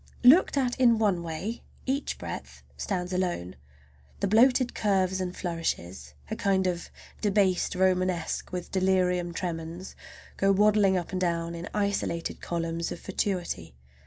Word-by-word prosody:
Looked 285 +5 +7
at 250 -3 +1
in 235 -3 +5
one 200 -5 +2
way 170 +8 -4 0.2
each 275 +2 -1
breadth - - -7
stands 180 -2 -3
alone, 175 - -2 0.6
the - - +1
bloated 245 +4 +4
curves 190 -2 +1
and 180 0 -4
flourishes—a 85 - -4
kind 190 -1 +2
of 175 -2 -2 0.3
"debased 195 -4 +2
Romanesque" 185 -2 0
with 180 -1 -5
delirium 180 -2 +2
tremens—go 170 +3 -4
waddling 205 -1 +4
up 175 - -4
and 185 -1 -2
down 170 -1 0
in 170 +1 -6
isolated 200 -5 -1
columns 165 0 -2
of - - -5
fatuity. 180 - -3
185 Hz, 130 wpm, -28 LUFS, 170-200 Hz, 0.6 s, Looked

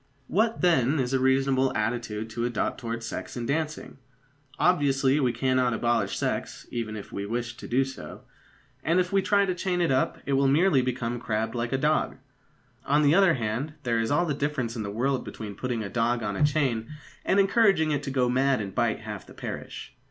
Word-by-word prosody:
What, 220 - +1
then, 155 -5 +3
is 130 0 -1
a 135 - +3
reasonable 130 0 +2
attitude 110 -1 -2
to 115 +1 -3
adopt 120 0 -1
towards 115 -2 -4
sex 115 - -6
in 120 - -3
dancing? 155 +1 -3 0.6
Obviously 140 -5 +3
we 130 -4 +2
cannot 125 0 +1
abolish 115 -4 0
sex, - - -3
even 115 -2 -3
if 105 - -8
we 100 0 -4
wished 120 +1 -4
to - - -8
do 130 +3 +2
so. 135 - -9 0.6
And 165 +4 +2
if 180 +1 -1
we 195 - +4
try 200 +1 +3
to 185 - 0
chain 180 0 -1
it 170 -5 +2
up, 130 0 +1
it 140 - -1
will 135 0 +3
merely 145 0 +4
become 120 -1 -2
crabbed 110 -1 -2
like 120 -1 -2
a 135 - +1
dog. 150 +3 +1 0.7
On 145 +2 +2
the 145 +1 +5
other 190 -2 +5
hand, 125 +5 -3
there 120 -3 +1
is 115 - 0
all 160 +5 +2
the 155 - -1
difference 140 -5 -2
in 115 - -3
the 100 - -4
world 130 +6 0
between 105 -2 -7
putting 120 +1 -3
a - - -4
dog 120 +1 0
on 105 -2 -2
a - - +1
chain 135 -7 +1 0.3
and 195 - +2
encouraging 195 -6 +4
it 145 -2 0
to 140 - -5
go 130 -2 +1
mad 130 +2 +2
and 100 -3 -5
bite - - 0
half - - -7
the - - -14
parish. - - -7
130 Hz, 210 wpm, -27 LUFS, 115-150 Hz, 0.7 s, the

